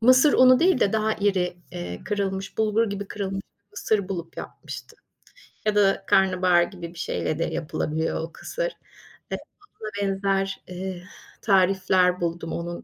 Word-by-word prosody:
mısır 255 +5 +6
unu 255 +1 +7
değil 345 -6 +4
de 200 - +3
daha 220 0 +2
iri, 185 -3 0 0.5
kırılmış 195 -1 -2
bulgur 220 0 +2
gibi, 200 0 -5
kırılmış 195 -1 -3 0.2
bir 200 - -51
mısır 205 -2 0
bulup 170 -4 -5
yapmıştım 465 - -8 0.7
ya 215 -1 +2
da 195 -1 +3
karnabahar 185 -2 +4
gibi 175 -2 -7
bir 170 - -11
şeyle 155 -2 -2
de - - +2
yapılabiliyor 160 -1 -2
o 165 +1 -6
kısır. - - -3 0.6
Ve - - 0 0.4
buna 215 - -4
benzer, 195 0 0
eee, 185 0 -5 0.4
tarifler 185 -2 +3
buldum 170 -1 -2
onun. 170 0 -5
195 Hz, 145 wpm, -25 LUFS, 180-210 Hz, 0.7 s, unu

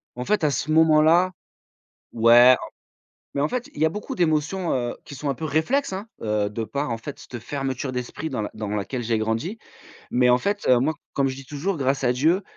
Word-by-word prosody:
En 125 +1 -5
fait 210 +1 +1
à 150 - +3
ce 145 +3 -2
moment 155 -1 +5
là 170 +4 +4 0.8
ouais 120 +2 +7
en - - -7 0.7
mais 140 - 0
en 145 - +2
fait 250 - -4
il - - -6
y - - +5
a 160 - +3
beaucoup 210 - -6
d'émotions, 170 +1 0
heu, 120 -2 -2
qui - - -10
sont 140 +1 -4
un 135 - -1
peu 155 - -5
réflexes, 190 - 0
hein, 195 +4 -5 0.2
heu, 105 -1 0
de 110 +2 -4
par 140 +7 -3
en 115 - -2
fait 140 +5 -8
cette 120 - -8
fermeture 135 +1 -3
d'esprit 130 +5 -5
dans 125 - -2
laq 105 - -4
dans 105 -1 -4
laquelle 105 +4 -3
j'ai 115 -1 0
grandi. 115 - -2 0.5
Mais 125 0 +3
en 125 - +5
fait, 200 +9 -2
heu, 125 - +6
moi 140 +6 +1 0.2
comme 140 -1 +1
je 130 - -3
dis 135 - -10
toujours, 160 +6 -2
grâce 135 0 0
à 125 -1 +3
Dieu 160 +10 +2
140 Hz, 235 wpm, -24 LUFS, 120-160 Hz, 0.8 s, ouais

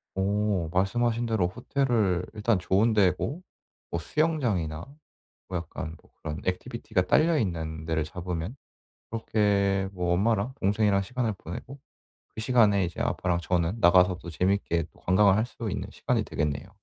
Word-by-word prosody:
어 100 -2 0
말씀하신 115 +5 +1
대로 110 -6 +1
호텔을 110 -4 0
일단 110 0 +1
좋은 100 +5 +2
데고 105 - +1 0.5
뭐 85 - -1
수영장이나 105 - 0 0.6
뭐 90 - -2
약간 80 -1 -6
뭐 - - -25
그런 75 -1 -5
액티비티가 110 +1 -1
딸려 160 - +4
있는 80 - -2
데를 80 -1 0
잡으면 90 - -5 0.6
그렇게 100 -3 +1
뭐 90 -2 0
엄마랑 110 +5 +1
동생이랑 100 0 +2
시간을 115 +1 -2
보내고 110 - -8 0.6
그 - - -5
시간에 110 -5 +4
이제 85 -1 -5
아빠랑 90 -1 0
저는 90 +3 0
나가서 90 0 +5
또 - - -10
재밌게 90 -1 0
또 - - -22
관광을 95 +1 +4
할 110 +2 +1
수 115 -3 -5
있는 - - -4
시간이 - - -1
되겠네요. 75 +4 -2
100 Hz, 330 characters per minute, -27 LUFS, 90-110 Hz, 0.6 s, 나가서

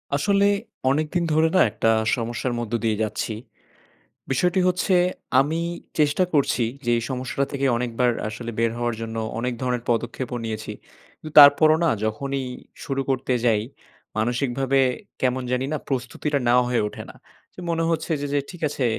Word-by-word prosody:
আসলে 200 +6 +2 0.4
অনেকদিন 155 +5 0
ধরে 160 +1 +4
না - - +5
একটা 110 +2 +1 0.3
সমস্যার 120 +1 -3
মধ্য 120 -1 -5
দিয়ে 110 -2 +1
যাচ্ছি। 110 +1 -3 1.0
বিষয়টি 180 +8 +2
হচ্ছে 180 +1 +2 0.4
আমি 150 +5 +1 0.4
চেষ্টা 150 +4 +3
করছি 140 -4 +2 0.2
যে, - - 0
এই 115 - -2
সমস্যাটা 130 +1 -2
থেকে 140 -1 -1
অনেকবার 125 0 +1 0.2
আসলে 115 +2 -6
বের 115 -1 +2
হওয়ার 120 -1 -1
জন্য। 115 0 -5 0.2
অনেক 125 +1 -1
ধরনের 125 -2 -1
পদক্ষেপও 120 +1 -2
নিয়েছি। 110 -1 -4 0.5
কিন্তু 155 - -10
তারপরও 150 +2 +8
না - - +4 0.2
যখনই 135 +5 -2 0.4
শুরু 135 -1 -1
করতে 130 -1 0
যাই, 110 -3 +3 0.6
মানসিকভাবে 125 +4 0 0.4
কেমন 130 0 +1
জানি 125 +1 0
না - - 0
প্রস্তুতিটা 135 +3 -1
নেওয়া 125 +1 +5
হয়ে 125 -3 +1
ওঠে - - -8
না। - - -12 0.4
যে - - -13
মনে 165 0 0
হচ্ছে 165 0 -1
যে 145 - -2
যে 145 - +3
ঠিক 175 -1 -11
আছে 140 -2 -2
130 Hz, 160 wpm, -23 LUFS, 120-145 Hz, 1.0 s, তারপরও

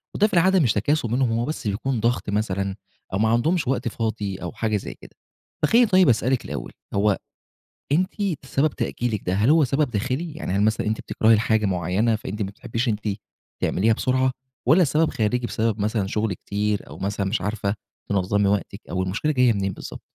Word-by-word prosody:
وده 210 - +4
في - - -11
العادة 185 +2 +4
مش 120 -9 +3
تكاسُل 120 +4 0
منهم، 125 -1 +2
هُم 115 +1 0
بس 155 -8 -4
بيكون 115 +5 -1
ضغط 115 -1 0
مثلًا، 100 -2 -1 0.4
أو - - +1
ما 110 - +3
عندهُمش 140 +7 +1
وقت 130 -2 0
فاضي 110 -4 -2
أو 90 -2 -5
حاجة 110 -2 -1
زي - - -6
كده، - - -16 0.5
فخلّيني 230 +8 +5
طيب 185 -7 +5
أسألِك 125 +2 +1
الأول، - - -5 0.2
هو 100 0 +2 0.7
أنتِ 185 +5 +2 0.3
سبب 135 +3 +1
تأجيلِك 115 -4 -2
ده 90 - +1
هل 105 +7 +2
هو 160 0 +6
سبب 140 +3 +1
داخلي؟ 130 +10 -2
يعني 155 - -4
هل 100 - +2
مثلًا 110 0 +1
أنت 110 - -1
بتكرهي 110 +1 +3
الحاجة 110 -1 +2
مُعيّنة، 95 +5 +1
فأنتِ 105 0 -5
ما 100 - 0
بتحبيش 115 +4 -3
أنتِ 105 -2 0 0.6
تعمليها 110 +4 +2
بسُرعة؟ 130 +2 +1 0.3
والَّا 155 +8 +5
السبب 155 +1 +3
خارجي، 120 +3 0
بسبب 110 -2 -1
مثلًا 105 -1 0
شُغل 105 0 -1
كتير، 105 +3 -2
أو - - -9
مثلًا 100 0 -2
مش 95 +1 -1
عارفة 100 0 -1 0.3
تنظمي 100 +1 +1
وقتِك؟ 100 0 -2
أو 95 +1 -1
المشكلة 100 +12 -1
جاية 125 -4 +4
منين 95 -2 -1
بالضبط؟ - - -9
110 Hz, 190 wpm, -23 LUFS, 100-130 Hz, 0.7 s, هو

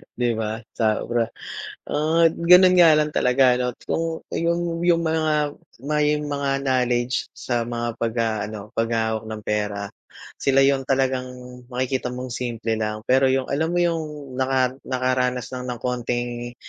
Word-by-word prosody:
'Di 120 0 0
ba, 110 +1 -3
sobra. 115 +1 0 0.6
Ah, 160 +3 +2
ganun 180 +2 +6
nga 175 -2 +7
lang 150 0 0
talaga 125 0 +4
ano, 125 0 0 0.2
kung 165 0 -2
yung 170 0 -1
yung 175 -1 +3
mga 155 -2 +1 0.3
may 150 0 +2
mga 145 -1 -2 0.2
knowledge 125 -1 0
sa 120 -2 -1
mga 120 0 -3
pagha 115 0 0 0.2
ano, 105 -1 -9
paghawak 110 -1 -1
ng 110 -1 -6
pera, 105 -1 -2 0.5
sila 135 0 +4
yung 135 -1 +2
talagang 130 -1 +1 0.4
makikita 130 0 -2
mong 125 0 -6
simple 120 -2 -3
lang, 110 0 -3
pero 130 +2 +3
yung, 130 0 0
alam 155 +3 +1
mo 175 - +3
yung, 155 -5 -3
naka-nakaranas 130 -1 0
lang 125 0 -5
ng 125 -2 -4
konting, 120 -1 -3
130 Hz, 140 wpm, -23 LUFS, 120-150 Hz, 0.6 s, nga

